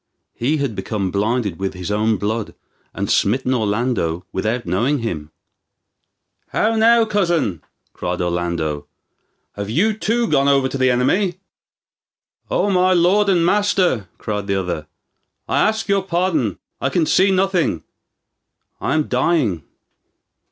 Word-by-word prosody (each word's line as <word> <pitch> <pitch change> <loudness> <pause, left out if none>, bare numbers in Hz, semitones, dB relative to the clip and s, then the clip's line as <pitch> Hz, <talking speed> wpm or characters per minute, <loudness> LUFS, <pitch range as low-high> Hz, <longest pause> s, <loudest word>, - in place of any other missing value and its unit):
He 140 +7 0
had 140 -5 -1
become 95 -1 -3
blinded 105 -2 -1
with 95 0 -3
his 90 +2 -5
own 110 +1 +1
blood, 105 +3 -3 0.4
and - - -3
smitten 130 +5 +1
Orlando 105 -7 -1
without 110 +5 -2
knowing 115 +12 +1
him. 80 -9 -4 1.2
"How 225 +1 +1
now, 230 +1 +5
cousin," 170 - 0 0.3
cried 90 0 -3
Orlando, 85 -4 -2 0.7
"have 100 0 -5
you 195 - +2
too 230 +2 0
gone 140 -5 +2
over 135 -1 +3
to 130 - -4
the 130 0 +4
enemy?" 175 +9 +1 1.1
"O 205 - +1
my 185 0 +3
lord 185 +4 +3
and 175 -3 +3
master," 180 - +1
cried 105 -2 -4
the 100 - 0
other, 85 -5 -4 0.6
"I - - +1
ask 220 +1 +1
your 200 -1 +2
pardon. 170 - 0 0.2
I - - +1
can 170 -3 +1
see 190 +5 +3
nothing; 185 - +1 1.0
I - - -1
am 155 - +2
dying. 125 - +1
125 Hz, 135 wpm, -20 LUFS, -, 1.2 s, now